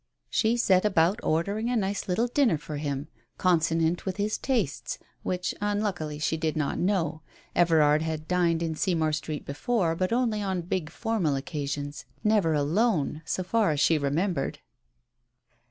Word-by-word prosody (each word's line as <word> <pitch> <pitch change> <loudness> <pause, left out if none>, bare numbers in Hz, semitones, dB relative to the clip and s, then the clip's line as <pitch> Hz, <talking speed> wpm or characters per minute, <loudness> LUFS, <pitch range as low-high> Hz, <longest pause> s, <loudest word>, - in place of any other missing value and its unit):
She 230 +1 +2
set 190 -5 +4
about 190 0 +3
ordering 200 +9 0
a 250 - 0
nice 200 -2 -1
little 185 +6 +1
dinner 245 - +2
for 150 0 -6
him, 145 -1 -3 0.3
consonant 165 -1 +2
with 190 -1 -3
his 210 +1 -1
tastes, 145 - -1 0.2
which 180 -1 -2
unluckily 205 -7 -1
she 155 +2 0
did 155 -1 -1
not 150 -2 -1
know. 170 -5 0 0.3
Everard 155 -3 +4
had 160 -1 -3
dined 170 -2 +2
in 165 -1 -1
Seymour 160 -2 0
Street 155 -1 -4
before, 165 +3 0
but 185 +3 -1
only 230 -3 +1
on 190 -3 -1
big 170 -2 -2
formal 190 -6 0
occasions, 145 0 -4 0.2
never 210 -7 +3
alone, 155 0 +1
so 185 - -2
far 215 +1 +2
as 150 -2 0
she 155 +1 +4
remembered. 150 +3 -1
170 Hz, 155 wpm, -27 LUFS, 155-205 Hz, 0.3 s, set